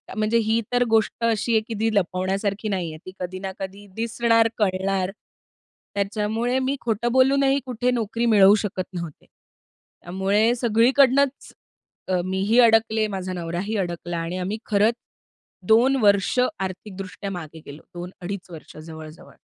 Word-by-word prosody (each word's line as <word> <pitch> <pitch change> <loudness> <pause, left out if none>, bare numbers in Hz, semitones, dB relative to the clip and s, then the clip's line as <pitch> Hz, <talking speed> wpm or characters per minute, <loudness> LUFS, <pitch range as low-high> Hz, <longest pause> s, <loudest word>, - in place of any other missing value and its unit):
म्हणजे 215 +2 +1
ही 220 +1 +1
तर 245 0 +4
गोष्ट 220 -1 +2
अशी 230 +1 +1
आहे 220 - +4
की 230 - -4
ती 225 0 +1
लपवण्यासारखी 195 +3 -1
नाहीये 170 -5 -3
ती 185 - -8
कधी 185 +1 -5
ना 190 0 -5
कधी 195 +2 -7
दिसणार, 230 0 +2
कळणार. 190 -2 0 0.8
त्याच्यामुळे 215 +5 -1
मी 265 +2 -1
खोटं 235 +1 -1
बोलूनही 270 +1 +3
कुठे 250 0 -1
नोकरी 230 0 -1
मिळवू 205 -2 +6
शकत 185 -2 -3
नव्हते. 170 -4 -7
त्यामुळे 195 +6 -3
सगळीकडनंच 260 +4 +2 0.5
अ, 185 -1 +1
मी 190 0 -2
ही 235 +3 +4
अडकले 225 -2 +4
माझा 190 -2 -4
नवराही 175 +5 -3
अडकला 175 -2 -3
आणि 165 +2 -3
आम्ही 190 +4 -3
खरंच 215 +2 +2 0.7
2 240 +5 +5
वर्ष 200 +3 +3 0.2
आर्थिक 190 +1 -5
दृष्ट्या 195 +1 -6
मागे 160 -3 -8
गेलो. 145 +2 -10
2-2.5 180 +2 -7
वर्ष 160 - -11
जवळ, 160 0 -9
जवळ. 160 - -16
205 Hz, 145 wpm, -23 LUFS, 185-230 Hz, 0.8 s, मिळवू